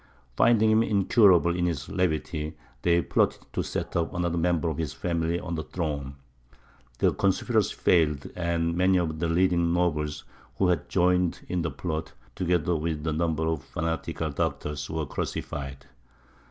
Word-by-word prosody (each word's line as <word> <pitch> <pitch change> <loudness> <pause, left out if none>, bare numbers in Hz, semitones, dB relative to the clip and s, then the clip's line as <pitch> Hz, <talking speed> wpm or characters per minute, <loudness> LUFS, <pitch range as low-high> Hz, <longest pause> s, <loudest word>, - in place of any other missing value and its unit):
Finding 110 - +4
him 110 +1 +5
incurable 100 -5 +4
in 90 0 +1
his 75 -5 -3
levity, 80 -3 -2 0.2
they 85 -1 +3
plotted - - +1
to - - 0
set - - -4
up 85 -1 0
another 85 -1 0
member 85 -1 +1
of 80 -2 -2
his 80 -4 -2
family 85 -1 -1
on 85 -1 -5
the 80 - -2
throne. 75 -5 -4 0.8
The - - +3
conspiracy - - +1
failed, 75 -5 +2
and 85 -1 0
many 95 +1 +3
of 80 -3 -1
the 85 - 0
leading 85 0 +2
nobles, 75 -4 0 0.3
who 95 - +3
had 90 - 0
joined 90 -1 +2
in 90 -1 -1
the 80 - -1
plot, 80 -2 -4 0.2
together 90 -2 +1
with 80 -1 -2
a 80 - 0
number 80 0 0
of 80 -3 -1
fanatical 80 -1 -3
doctors, 70 0 -3
were 80 -1 -2
crucified. 70 0 -5
85 Hz, 155 wpm, -27 LUFS, 80-90 Hz, 0.8 s, him